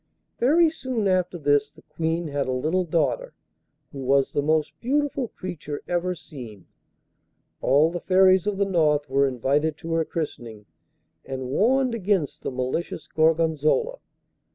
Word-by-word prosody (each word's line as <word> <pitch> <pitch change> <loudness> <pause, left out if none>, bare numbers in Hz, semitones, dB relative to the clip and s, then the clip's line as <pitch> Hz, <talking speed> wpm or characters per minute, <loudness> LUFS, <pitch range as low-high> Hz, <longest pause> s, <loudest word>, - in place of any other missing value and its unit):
Very 320 +7 +5
soon 255 -9 -2
after 185 -1 +1
this 145 -2 +2
the - - -20
Queen 160 +1 -2
had 140 -1 -2
a - - -1
little 160 +8 0
daughter, 155 -5 -1 0.6
who 140 - -8
was 135 +1 +2
the 145 - +1
most 155 0 +1
beautiful 280 0 0
creature 165 -8 -7
ever 180 +1 -1
seen; 120 - -11 1.0
all 145 +5 +4
the 175 - -3
Fairies 185 0 +4
of 205 -2 -1
the 200 - +2
North 155 -6 +2
were 140 +1 +3
invited 140 +5 0
to 165 +1 -5
her 165 0 +2
christening, 120 -10 -6 0.6
and 130 -1 -5
warned 255 - +2
against 195 -8 -1
the - - -3
malicious 130 +6 -3
Gorgonzola. 160 - +1
160 Hz, 145 wpm, -24 LUFS, 145-185 Hz, 1.0 s, Very